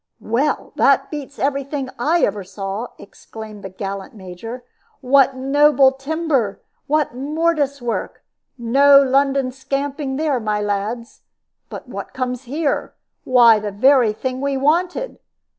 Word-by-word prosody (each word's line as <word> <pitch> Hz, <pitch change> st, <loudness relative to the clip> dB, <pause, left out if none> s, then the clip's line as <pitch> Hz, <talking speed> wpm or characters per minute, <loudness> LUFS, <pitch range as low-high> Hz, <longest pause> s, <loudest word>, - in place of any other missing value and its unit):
"Well, 255 Hz, +7 st, -1 dB
that -, -, +3 dB
beats 285 Hz, -2 st, -7 dB
every 275 Hz, 0 st, 0 dB
thing 275 Hz, -2 st, -5 dB
I 315 Hz, +7 st, +2 dB
ever 205 Hz, 0 st, 0 dB
saw," 195 Hz, +4 st, -5 dB
exclaimed 215 Hz, +1 st, -11 dB
the 195 Hz, -, -6 dB
gallant 195 Hz, +2 st, -6 dB
Major. 210 Hz, +6 st, -9 dB, 0.4 s
"What 275 Hz, 0 st, +3 dB
noble 275 Hz, +1 st, +4 dB
timber! 275 Hz, -5 st, -2 dB, 0.3 s
What 300 Hz, -3 st, +1 dB
mortise 290 Hz, 0 st, -1 dB
work! 235 Hz, -1 st, -4 dB, 0.3 s
No 275 Hz, +4 st, +5 dB
London 275 Hz, -1 st, +2 dB
scamping 275 Hz, +1 st, -3 dB
there, 295 Hz, -3 st, 0 dB
my 215 Hz, -2 st, -1 dB
lads. 210 Hz, +3 st, -3 dB, 0.5 s
But -, -, -9 dB
what -, -, -8 dB
comes 255 Hz, 0 st, -3 dB
here? 290 Hz, +3 st, -2 dB, 0.3 s
Why, 235 Hz, -4 st, +6 dB
the 210 Hz, 0 st, -4 dB
very 245 Hz, +2 st, +4 dB
thing 255 Hz, +4 st, -4 dB
we 280 Hz, -1 st, -1 dB
wanted! 350 Hz, -, 0 dB
265 Hz, 130 wpm, -20 LUFS, 225-280 Hz, 0.5 s, Why